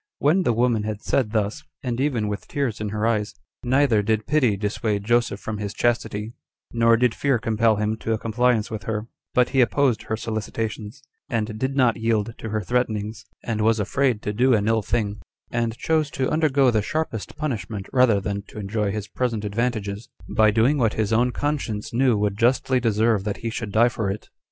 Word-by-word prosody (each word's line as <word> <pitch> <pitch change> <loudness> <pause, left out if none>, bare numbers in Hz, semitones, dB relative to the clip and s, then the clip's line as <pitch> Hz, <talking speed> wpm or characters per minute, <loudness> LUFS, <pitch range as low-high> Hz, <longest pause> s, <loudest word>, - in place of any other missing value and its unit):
4. 145 - +3
When 185 +5 +4
the 120 - +2
woman 120 -1 +2
had 105 -1 -4
said 130 -6 +1
thus, 110 +6 -1 0.2
and 125 -1 -2
even 125 -7 0
with 105 -1 -4
tears 130 -7 -2
in 105 - -2
her 105 +1 -2
eyes, 105 -2 0 0.3
neither 130 -3 +3
did 110 +1 0
pity 130 -8 +2
dissuade 105 0 -1
Joseph 120 -2 +1
from 105 -1 -5
his 100 -1 -4
chastity, 115 -2 -1 0.4
nor 115 0 +4
did 125 -1 +2
fear 140 -3 +1
compel 110 0 +2
him 105 +1 0
to 115 - -4
a - - 0
compliance 115 0 +1
with 110 -1 -5
her; 110 -1 -2 0.3
but 125 -1 +4
he 135 -1 +3
opposed 125 +1 +2
her 110 - -3
solicitations, 110 +2 -4 0.3
and 110 -2 -2
did 130 +2 -1
not 125 -4 +3
yield 115 -1 0
to 110 - -5
her 110 0 -1
threatenings, 110 -2 -2 0.2
and 110 -2 -2
was 110 +1 +3
afraid 120 +2 0
to 105 - -2
do 125 +3 +4
an 105 -1 0
ill 115 0 +2
thing, 105 -1 -2 0.3
and 115 -1 -1
chose 155 +1 +1
to 130 -2 -2
undergo 140 -4 +3
the 110 -2 +2
sharpest 120 -3 -3
punishment 115 -9 -3
rather 125 -6 +4
than 100 +1 -3
to - - -13
enjoy 105 0 -1
his 105 0 -4
present 115 -1 -2
advantages, 110 0 -2 0.3
by 110 -1 +5
doing 115 +7 +3
what 115 -3 +2
his 110 0 0
own 120 +3 +3
conscience 140 -3 -3
knew 125 -2 +3
would 100 0 -1
justly 130 +2 +3
deserve 110 -2 +2
that 105 -1 -3
he 115 - -1
should 110 -3 -4
die 115 +3 +5
for 110 -4 -2
it. 100 +2 -5
115 Hz, 200 wpm, -23 LUFS, 105-125 Hz, 0.4 s, by